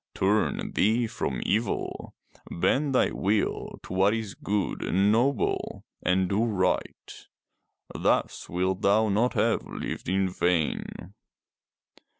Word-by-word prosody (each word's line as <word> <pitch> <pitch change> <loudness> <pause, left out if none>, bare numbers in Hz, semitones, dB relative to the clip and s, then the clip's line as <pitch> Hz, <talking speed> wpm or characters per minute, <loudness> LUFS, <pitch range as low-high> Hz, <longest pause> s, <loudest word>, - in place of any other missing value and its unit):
Turn 105 +3 +1
thee 115 +4 +2
from 70 - -3
evil; 110 +3 -2 0.3
bend 135 - +1
thy - - +3
will 100 +2 -1
to - - -8
what 95 +3 +3
is 110 -3 -4
good 100 -1 -2
and 100 +3 +2
noble, 125 +6 0 0.2
and 95 0 +2
do 100 +4 +1
right. 95 -6 -2 0.7
Thus - - 0
wilt 95 +2 -1
thou 105 +2 +3
not 110 +5 +2
have 115 0 +1
lived - - -6
in 95 +1 +2
vain." 90 +1 -1
100 Hz, 120 wpm, -27 LUFS, 95-110 Hz, 0.7 s, thy